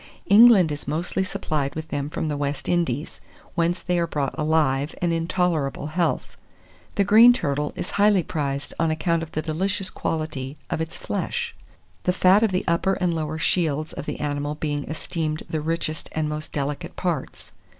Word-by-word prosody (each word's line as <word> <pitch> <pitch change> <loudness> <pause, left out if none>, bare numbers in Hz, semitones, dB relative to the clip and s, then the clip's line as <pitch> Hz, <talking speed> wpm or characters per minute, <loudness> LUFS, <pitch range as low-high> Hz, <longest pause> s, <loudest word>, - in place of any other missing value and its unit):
England 205 -5 +7
is 145 -2 -5
mostly 170 +5 -1
supplied 155 -8 -2
with 160 0 -5
them 145 -1 -2
from 155 - -3
the 150 - -1
West 145 0 -3
Indies, 165 -5 -1 0.3
whence 175 0 0
they 180 -1 0
are 170 - +1
brought 145 -4 -2
alive 150 -2 +1
and 175 -1 +1
in 165 0 -1
tolerable 165 -7 0
health. 170 +3 -1 0.6
The 200 - +3
green 225 +5 +8
turtle 150 - -1
is - - -4
highly 205 -3 +4
prized 140 -3 -3
on 165 - +2
account 165 +1 +1
of 160 -1 -7
the 155 - -2
delicious 190 +4 -1
quality 150 -3 -3
of - - -1
its 160 0 -4
flesh, - - -3 0.5
the 180 - +3
fat 185 +3 +5
of 225 -3 +3
the 185 - -1
upper 170 +3 +2
and 180 -3 0
lower 155 -1 -2
shields 155 -2 0
of 145 - -7
the - - -4
animal 145 0 -2
being 145 -2 -2
esteemed 155 0 -3
the 155 - -2
richest 160 0 -3
and 155 -1 0
most 150 0 -4
delicate 145 0 -3
parts. - - -3
160 Hz, 180 wpm, -24 LUFS, 150-180 Hz, 0.6 s, green